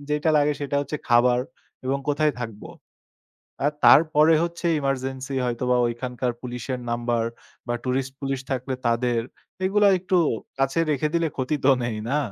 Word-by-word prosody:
যেটা 150 Hz, +2 st, +1 dB
লাগে 150 Hz, 0 st, +3 dB
সেটা 140 Hz, 0 st, -2 dB
হচ্ছে 145 Hz, +2 st, -4 dB
খাবার 120 Hz, 0 st, +4 dB, 0.5 s
এবং 135 Hz, +1 st, 0 dB
কোথায় 150 Hz, 0 st, +2 dB
থাকব। 110 Hz, -3 st, -6 dB, 1.0 s
আর 145 Hz, -, +4 dB
তারপরে 155 Hz, +1 st, +6 dB
হচ্ছে 170 Hz, 0 st, -3 dB
এমার্জেন্সি 135 Hz, 0 st, -3 dB
হয়তোবা 125 Hz, +1 st, 0 dB
ওইখানকার 125 Hz, +1 st, -3 dB
পুলিশের 125 Hz, +1 st, -4 dB
নাম্বার 120 Hz, 0 st, 0 dB, 0.4 s
বা 120 Hz, -, -1 dB
টুরিস্ট 130 Hz, +1 st, -1 dB
পুলিশ 135 Hz, -1 st, -2 dB
থাকলে 130 Hz, 0 st, -2 dB
তাদের, 120 Hz, 0 st, +1 dB, 0.4 s
এইগুলা 205 Hz, +2 st, +4 dB
একটু 185 Hz, +1 st, 0 dB, 0.4 s
কাছে 135 Hz, +3 st, +1 dB
রেখে 150 Hz, +1 st, +1 dB
দিলে 165 Hz, -1 st, +2 dB
ক্ষতি 140 Hz, +3 st, -1 dB
তো 140 Hz, -, +6 dB
নেই 110 Hz, -3 st, -3 dB
না? 145 Hz, -, +2 dB
135 Hz, 145 wpm, -24 LUFS, 125-150 Hz, 1.0 s, তারপরে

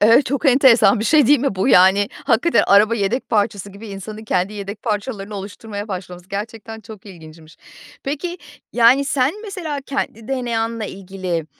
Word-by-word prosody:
Evet, 230 Hz, +6 st, +5 dB
çok 280 Hz, +4 st, -1 dB
enteresan 245 Hz, -6 st, +5 dB
bir -, -, -2 dB
şey 295 Hz, +2 st, +4 dB
değil 290 Hz, +3 st, +5 dB
mi 265 Hz, -4 st, -1 dB
bu, 190 Hz, +6 st, 0 dB
yani, 195 Hz, -1 st, +5 dB, 0.2 s
hakikaten 275 Hz, +5 st, +3 dB
araba 210 Hz, +3 st, +5 dB
yedek 230 Hz, +4 st, -2 dB
parçası 205 Hz, -3 st, -1 dB
gibi 210 Hz, +3 st, -11 dB
insanın 210 Hz, +2 st, -8 dB
kendi 185 Hz, -1 st, -1 dB
yedek 205 Hz, 0 st, -7 dB
parçalarını 210 Hz, -1 st, -4 dB
oluşturmaya 205 Hz, +2 st, -7 dB
başlaması 180 Hz, -2 st, -7 dB
gerçekten 220 Hz, +2 st, -6 dB
çok 215 Hz, -2 st, -13 dB
ilginçmiş. 160 Hz, -3 st, -14 dB, 0.5 s
Peki, 340 Hz, +6 st, -4 dB, 0.3 s
yani, 245 Hz, +4 st, +5 dB
sen 280 Hz, +9 st, -1 dB
mesela 355 Hz, -9 st, -5 dB
kendi 230 Hz, -5 st, -4 dB
DNA'nla 230 Hz, -3 st, -2 dB
ilgili, 185 Hz, -4 st, -5 dB
215 Hz, 155 wpm, -19 LUFS, 195-255 Hz, 0.5 s, Evet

